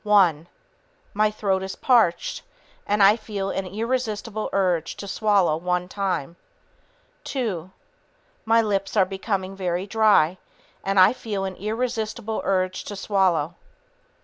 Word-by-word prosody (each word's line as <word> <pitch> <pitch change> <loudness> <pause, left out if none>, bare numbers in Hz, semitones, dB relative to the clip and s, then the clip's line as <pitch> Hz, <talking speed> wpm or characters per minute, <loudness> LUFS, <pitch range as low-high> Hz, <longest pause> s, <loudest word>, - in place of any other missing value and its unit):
"One... 180 -7 +3 0.7
My 215 +1 +3
throat 200 -3 -1
is 190 0 -5
parched, 225 -10 +2 0.5
and 205 0 +3
I 200 +2 +7
feel 205 -3 -4
an 195 -1 -3
irresistible 220 0 -2
urge 180 -4 0
to 200 - -7
swallow 195 -6 +2
one 180 +1 -1
time. 185 -5 -3 0.9
Two... 200 - -3 0.7
My 230 +1 +4
lips 200 0 -1
are 190 - +5
becoming 190 0 -3
very 180 -1 -2
dry, 200 -5 +3 0.4
and 195 0 +1
I 185 +4 +7
feel 205 -6 -4
an 190 -1 -5
irresistible 225 0 -3
urge 185 -1 0
to 205 - -6
swallow. 185 -5 +1
195 Hz, 125 wpm, -24 LUFS, 185-215 Hz, 0.9 s, I